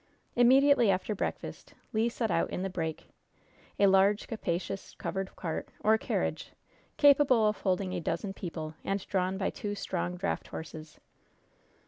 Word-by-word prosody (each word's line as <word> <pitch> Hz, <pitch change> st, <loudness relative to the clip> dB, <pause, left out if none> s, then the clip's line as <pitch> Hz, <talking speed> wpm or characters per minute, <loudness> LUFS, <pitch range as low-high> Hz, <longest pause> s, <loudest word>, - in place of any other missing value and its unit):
Immediately 260 Hz, 0 st, +6 dB
after 190 Hz, +3 st, +1 dB
breakfast 200 Hz, -, -5 dB, 0.2 s
Le 225 Hz, +2 st, +2 dB
set 230 Hz, -3 st, -2 dB
out 165 Hz, -, +1 dB
in 180 Hz, -, -3 dB
the 195 Hz, -, -2 dB
"break" 160 Hz, -3 st, -4 dB, 0.7 s
a 200 Hz, -, +5 dB
large, 195 Hz, +1 st, +4 dB
capacious, 190 Hz, -2 st, -4 dB
covered 195 Hz, -1 st, -4 dB
cart, 165 Hz, -3 st, -4 dB
or 220 Hz, +1 st, +5 dB
carriage, -, -, -2 dB, 0.4 s
capable 275 Hz, -6 st, +5 dB
of 210 Hz, -, 0 dB
holding 185 Hz, -1 st, 0 dB
a -, -, -1 dB
dozen 195 Hz, +4 st, -2 dB
people, 160 Hz, -4 st, -6 dB
and 195 Hz, 0 st, -2 dB
drawn 190 Hz, -1 st, 0 dB
by 195 Hz, -, -1 dB
two 205 Hz, -1 st, -4 dB
strong 180 Hz, -2 st, -3 dB
draft 195 Hz, +2 st, -2 dB
horses. 155 Hz, 0 st, -9 dB
195 Hz, 145 wpm, -30 LUFS, 180-220 Hz, 0.7 s, Immediately